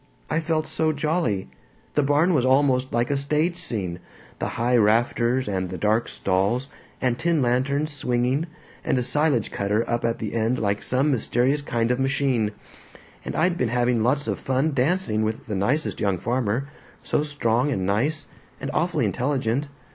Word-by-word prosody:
I 160 - +2
felt 160 -1 0
so 155 0 0
jolly. 150 - -1 0.5
The 150 - +3
barn 145 +6 +3
was 135 -6 +2
almost 130 0 +3
like 120 +3 0
a - - +2
stage 150 +5 0
scene 100 - -4 0.4
the - - -1
high 120 +2 +2
rafters, 120 +3 +2
and 95 -2 -2
the 95 - -5
dark 110 +5 +1
stalls, 100 +8 0 0.3
and 125 -2 0
tin 170 -1 +2
lanterns 140 +5 +1
swinging, 125 +3 0 0.4
and - - +1
a 125 - +1
silage 145 -4 +2
cutter 105 +3 0
up 120 0 -1
at 115 0 0
the 110 - -5
end 115 +2 +1
like 100 -1 0
some 135 +4 +1
mysterious 130 +3 +1
kind 120 -4 0
of 125 - 0
machine. 135 -5 +1 0.7
And - - -5
I'd 175 +2 +1
been 125 - +1
having 120 -1 +1
lots 135 +6 +1
of - - -2
fun 135 +4 0
dancing 140 - +1
with 110 0 -2
the 105 - -3
nicest 130 +11 0
young 100 -3 +1
farmer, 120 +4 -1 0.4
so - - 0
strong 145 -3 0
and 95 -7 -1
nice, 140 +11 0 0.3
and - - -4
awfully - - +1
intelligent. 130 0 0
125 Hz, 170 wpm, -24 LUFS, 115-145 Hz, 0.7 s, The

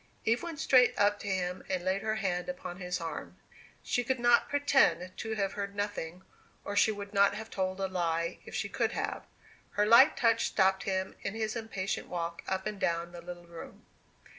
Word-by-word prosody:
Eve 230 +2 +2
went 340 -3 -6
straight 255 -4 +4
up 205 0 +3
to - - -7
him 180 -1 -1
and 185 -1 -2
laid 190 +1 +1
her 215 0 -1
hand 185 -3 -2
upon 270 -10 -6
his 180 -1 -3
arm. 165 -2 -6 0.5
She 245 - 0
could 260 +1 -1
not 240 0 +4
pretend 270 - +2
to 220 0 -3
have 195 -2 -1
heard 200 0 -4
nothing, 190 -4 -4 0.4
and 205 - -4
she 220 - +4
would 205 -1 -7
not 200 0 +4
have 220 +1 -7
told 185 0 -2
a 195 - 0
lie 170 -2 -1
if - - -9
she - - -1
could. - - -1
Her 210 - -4
light 235 +7 +7
touch 230 -1 +3
stopped 190 -1 +2
him 190 -1 -1
in 195 - -4
his 220 0 -2
impatient 200 -4 -3
walk 170 -1 -4
up 190 0 -2
and 210 -2 -4
down 170 -1 -1
the 175 -1 -9
little 175 0 -9
room. 170 -1 -11
195 Hz, 195 wpm, -31 LUFS, 180-220 Hz, 0.5 s, light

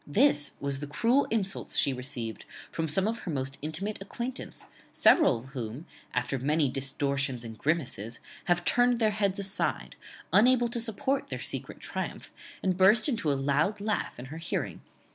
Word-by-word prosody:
This 150 - +4
was 140 -1 -1
the 145 - -5
cruel 235 - +2
insults 200 -4 -1
she 140 - +3
received 125 -4 -5 0.3
from 165 -1 -2
some 190 +6 +1
of 230 +1 -2
her - - -6
most 135 -1 -3
intimate 180 +8 -3
acquaintance, 240 +6 -6 0.3
several 315 - +5
of 125 +4 -11
whom, 125 +2 -6 0.3
after 135 - 0
many 150 +2 +2
distortions 135 -1 0
and 110 -1 -7
grimaces, 125 -5 -2 0.3
have 175 -1 +1
turned 245 0 +4
their 220 -2 +3
heads 200 -2 0
aside, 200 -1 0 0.4
unable 245 +2 +5
to 235 0 -1
support 265 +5 0
their - - -4
secret - - -4
triumph, - - -5 0.3
and 185 -2 +1
burst 205 +6 +5
into 230 - 0
a 140 - +1
loud 145 +9 +1
laugh 210 +1 -2
in 125 - -7
her - - -6
hearing." 165 - -3
165 Hz, 165 wpm, -29 LUFS, 135-215 Hz, 0.4 s, several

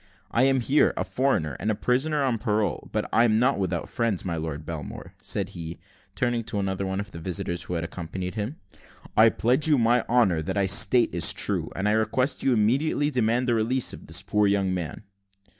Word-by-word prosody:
I 125 +3 +3
am 135 -1 +3
here, 140 +5 +2
a - - 0
foreigner, 90 - -1
and 110 - -2
a 110 - +1
prisoner 140 +6 0
on 125 -4 0
parole; 105 0 -1
but - - -2
I 115 - +5
am 110 -2 +3
not 125 0 +2
without 95 -3 -2
friends. 115 -6 -1
My 85 -2 -2
Lord 80 -2 -5
Belmore," 75 -5 -7
said - - -2
he, 85 0 -7 0.4
turning 120 -1 0
to 110 - -3
another 95 0 -2
of 100 +2 -4
the 85 - -8
visitors 85 0 -3
who 90 - -4
had 85 - -2
accompanied 90 +2 -6
him, 110 +6 -4 0.6
"I 110 +1 +7
pledge 125 +8 +2
you 150 -2 +4
my 120 +1 +3
honour 110 -9 +3
that 80 - -4
what 100 - +1
I - - +2
state 100 +5 +4
is - - +4
true; - - -1
and 95 +2 -1
I - - +3
request 120 +5 0
you - - +1
will 125 - +3
immediately 140 +7 +1
demand 125 0 +1
the 120 - +2
release 115 +3 +1
of - - -11
this - - -2
poor 105 -1 +1
young 100 -2 +1
man." 85 +1 -5
110 Hz, 215 wpm, -25 LUFS, 95-125 Hz, 0.6 s, I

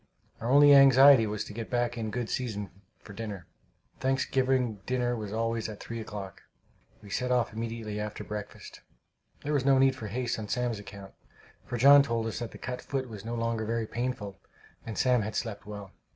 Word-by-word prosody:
Our 115 - -3
only 145 +2 +7
anxiety 135 -3 +8
was 105 0 -3
to - - -10
get 115 +1 -6
back 120 -1 0
in 110 -2 -3
good 120 +1 -3
season 110 -6 -3 0.3
for 100 - -13
dinner. 100 -4 -6 0.5
Thanksgiving 130 -3 +1
dinner 125 -1 0
was 105 -3 -5
always 115 0 -1
at 105 - -8
three 115 0 -6
o'clock. 100 -3 -7 0.6
We 100 - -12
set 125 +4 -1
off 125 -3 +1
immediately 115 -2 -4
after 105 0 -5
breakfast. 105 -1 -8 0.6
There 150 - -2
was 140 -3 +1
no 135 0 +4
need 135 0 +4
for 110 - -7
haste 120 +2 -2
on 105 - -5
Sam's 120 -1 -1
account, 100 -1 -11 0.5
for 120 - -3
John 140 +4 +8
told 115 -4 -1
us 115 - -3
that 120 -2 -4
the - - -12
cut 125 0 -5
foot 130 -2 -3
was 105 -3 -9
no 115 +1 -4
longer 115 -1 -1
very 115 +1 -1
painful, 110 -4 -4 0.5
and 110 - -5
Sam 125 -2 +3
had 110 +1 -4
slept 105 -3 -4
well. 100 -2 -8
115 Hz, 195 wpm, -29 LUFS, 105-125 Hz, 0.6 s, anxiety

